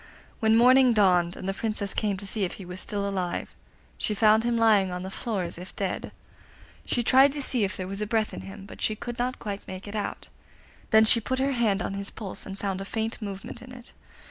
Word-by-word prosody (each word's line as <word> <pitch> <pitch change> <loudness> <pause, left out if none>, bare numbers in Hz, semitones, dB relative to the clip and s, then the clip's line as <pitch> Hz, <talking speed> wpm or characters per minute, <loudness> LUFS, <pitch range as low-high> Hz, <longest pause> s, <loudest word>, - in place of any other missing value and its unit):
When 220 -1 +4
morning 255 +1 +6
dawned, 180 -4 +3
and 185 - -7
the 195 - 0
Princess 210 -1 -2
came 205 -3 0
to 200 - -6
see 200 +1 0
if 180 - -1
he 195 - -9
was 180 +1 -7
still 200 0 -2
alive, 185 -3 -3 0.5
she 210 - 0
found 215 +1 +5
him 235 0 +1
lying 215 -4 +4
on 180 0 -4
the 190 - -6
floor 210 -3 -2
as 170 - -4
if 180 - -10
dead. - - -3 0.8
She 240 - 0
tried 270 +3 +6
to 290 - -3
see 245 -4 +1
if 195 - -2
there 185 - -4
was 195 +2 -3
breath 220 0 0
in - - -6
him, 195 0 -10
but - - -10 0.2
could 240 0 -6
not 250 +2 -1
quite 205 -2 -6
make 190 +2 -7
it 205 - -6
out. 210 - -4 0.6
Then 220 0 +6
she 230 - +7
put 260 +3 -2
her 270 +1 +1
hand 225 -6 +1
on - - -3
his 200 0 -5
pulse, 200 -4 -7
and 195 0 -7
found 195 -1 -3
a - - -3
faint 225 +3 -3
movement 195 -2 -6
in 250 - -11
it. 245 -1 -11
210 Hz, 235 wpm, -27 LUFS, 195-230 Hz, 0.8 s, she